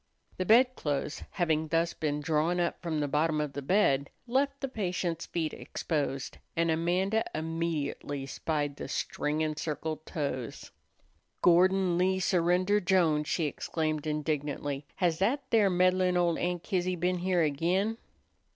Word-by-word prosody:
The 185 - -1
bedclothes, 220 - +2
having 160 -3 0
thus 165 +2 +1
been 150 -1 -2
drawn 160 +4 +1
up 170 -1 -1
from 165 -3 -2
the 145 - 0
bottom 155 +2 +1
of 150 -2 -2
the 140 - -4
bed, 140 -4 +2 0.2
left 275 +3 0
the 270 - -2
patient's 180 -7 -2
feet 160 -3 -2
exposed, 140 -4 -3 0.2
and 165 0 +2
Amanda 180 +7 +1
immediately 155 -3 -2
spied 145 0 -2
the - - -5
string 150 +1 -2
encircled 155 0 -3
toes. 140 -6 -4 0.7
"Gordon 180 0 +4
Lee 190 +1 +2
Surrender 185 +2 +2
Jones," 170 -6 +2
she 165 - 0
exclaimed 155 +1 -2
indignantly, 145 -2 -2
"has 170 -3 +1
that 250 +9 +1
there 215 -4 +5
meddlin' 185 0 +3
ol' 175 -1 +2
Aunt 175 0 -2
Kizzy 185 -2 0
been 180 +1 0
here 180 -1 +2
again?" 180 +9 0
170 Hz, 140 wpm, -30 LUFS, 150-185 Hz, 0.7 s, there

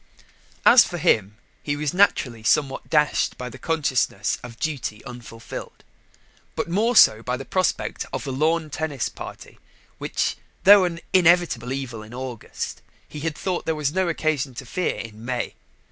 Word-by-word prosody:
As 240 -1 +9
for 175 - -5
him, 105 - +2 0.2
he 145 - -2
was 150 +1 -2
naturally 140 - +2
somewhat 135 +4 +1
dashed 150 -2 +2
by 125 0 -5
the - - -12
consciousness 130 -10 0
of 120 -2 -10
duty 135 -8 -4
unfulfilled, 120 -2 -9 0.7
but - - -2
more 215 +8 +1
so 110 - +7
by 125 +2 -2
the 135 - -8
prospect 185 -1 -1
of - - -4
a 135 - -3
lawn 155 +3 0
tennis 145 -4 -2
party, - - -10 0.4
which, - - -1 0.3
though 200 -1 +8
an 170 -1 -4
inevitable 175 -9 +3
evil 130 -5 -4
in 110 +3 -11
August, 125 -3 -6 0.3
he 150 - -8
had 155 0 -3
thought 185 -2 -3
there 160 - +1
was 150 -1 -1
no 190 0 +1
occasion 150 -5 -1
to 130 - -7
fear 180 +8 -1
in 110 -1 -9
May. 125 0 -3
145 Hz, 160 wpm, -23 LUFS, 120-165 Hz, 0.7 s, As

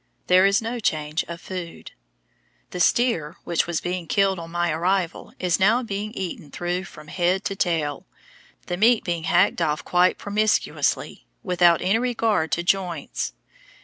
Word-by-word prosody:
There 185 +2 +5
is 200 +3 +2
no 235 +2 -3
change 155 -5 -1
of 170 0 -7
food. 180 -2 -7 0.8
The 180 - -5
steer 175 -8 +1
which 170 -1 0
was 170 -2 -1
being 180 -1 -3
killed 195 0 +2
on 165 0 -8
my 175 0 0
arrival 175 +2 -1
is 180 -2 0
now 225 +6 +3
being 210 -1 -4
eaten 175 -8 -5
through 175 +4 -3
from 150 -4 -13
head 180 +4 0
to 195 - -2
tail, 160 -6 -1 0.6
the 175 - -3
meat 225 +3 +4
being 170 -2 -2
hacked 175 +3 +3
off 150 -1 0
quite 180 +1 +3
promiscuously, 210 +1 0 0.2
without 175 -3 +3
any 195 +5 +2
regard 225 - 0
to 175 - 0
joints. 175 - -1
180 Hz, 155 wpm, -23 LUFS, 170-195 Hz, 0.8 s, There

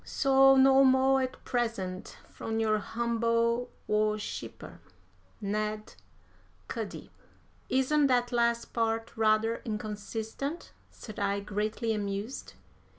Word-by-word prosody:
So 270 -1 +5
no 270 0 +6
mo' 265 0 +4
at 260 0 -4
present, 225 -7 -3
from 225 0 -4
your 215 -1 +2
humble 235 +2 0 0.2
worshipper, 210 0 -2 0.6
"NED 215 +1 -3 0.7
CUDDY." - - -6 0.6
"Isn't 280 +3 +3
that 245 -1 +2
last 235 -1 0
part 225 0 -1
rather 220 +1 +2
inconsistent?" 220 +7 -5 0.2
said 215 - -10
I, 200 0 0
greatly 215 +3 -2
amused. 205 +3 -4
225 Hz, 95 wpm, -29 LUFS, 215-255 Hz, 0.7 s, no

